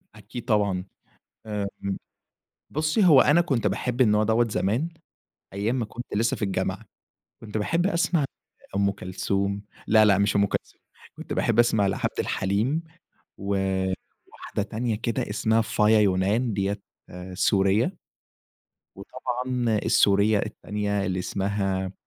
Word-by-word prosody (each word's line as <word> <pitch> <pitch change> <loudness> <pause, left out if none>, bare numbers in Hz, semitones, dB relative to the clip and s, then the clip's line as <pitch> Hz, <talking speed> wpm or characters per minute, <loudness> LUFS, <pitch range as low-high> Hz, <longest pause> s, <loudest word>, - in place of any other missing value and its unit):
أكيد 105 +3 -9
طبعًا، 100 -5 +1 0.6
آمم، 100 -2 -4 0.7
بصي 155 +7 +1
هو 150 -7 +8
أنا 155 +4 +5
كنت 130 -11 0
باحب 125 +3 -1
النوع 105 -3 +4
دوة 115 +2 +2
زمان 110 - 0 0.6
أيام 100 +5 -1
ما 120 - 0
كنت 120 +3 -8
لسه 115 +2 +1
في - - -9
الجامعة، 95 -2 -2 0.6
كنت 110 -1 -5
باحب 165 - +1
أسمع 170 -4 +1 0.5
أم 100 0 +2
كلثوم 100 +1 -2 0.3
لا، 110 0 +6
لأ، 100 -3 +5
مش 100 +1 +1
أم 100 0 +4
كلثوم، - - -5 0.4
كنت - - -6
باحب - - +1
أسمع 110 -4 +4
لعبد 95 - -2
الحليم 110 - 0 0.5
و 100 0 -1 0.8
واحدة - - -4
تانية 110 +3 -2
كده 115 -1 -2
إسمها 110 +1 +2
فايا 110 -1 +3
يونان 105 +5 +2
دية 100 +1 -1 0.5
سورية. 100 - +2 1.0
وطبعًا 125 -2 -2
السورية 100 +1 +4
التانية 100 -1 -2
اللي 95 0 -1
اسمها 95 0 -2
105 Hz, 125 wpm, -25 LUFS, 100-120 Hz, 1.0 s, هو